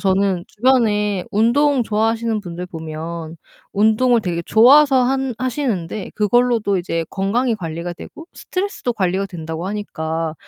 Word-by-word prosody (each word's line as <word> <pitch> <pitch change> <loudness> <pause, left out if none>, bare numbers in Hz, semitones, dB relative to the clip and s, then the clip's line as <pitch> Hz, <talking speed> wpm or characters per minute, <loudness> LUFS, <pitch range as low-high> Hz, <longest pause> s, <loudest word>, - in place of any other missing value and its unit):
저는 190 -2 +1
주변에 210 -5 +1
운동 245 +4 +2
좋아하시는 225 +1 0
분들 180 -1 -7
보면 160 0 -7 0.4
운동을 220 +4 +3
되게 170 -3 -2
좋아서 265 +3 +6
한 265 -1 -1
하시는데 225 - -3
그걸로도 215 -2 +2
이제 165 -2 -2
건강이 225 +5 0
관리가 170 -2 -5
되고 320 - -11
스트레스도 370 -10 -3
관리가 190 -1 -1
된다고 165 0 -6
하니까 165 -6 -3
210 Hz, 325 characters per minute, -19 LUFS, 175-245 Hz, 0.4 s, 좋아서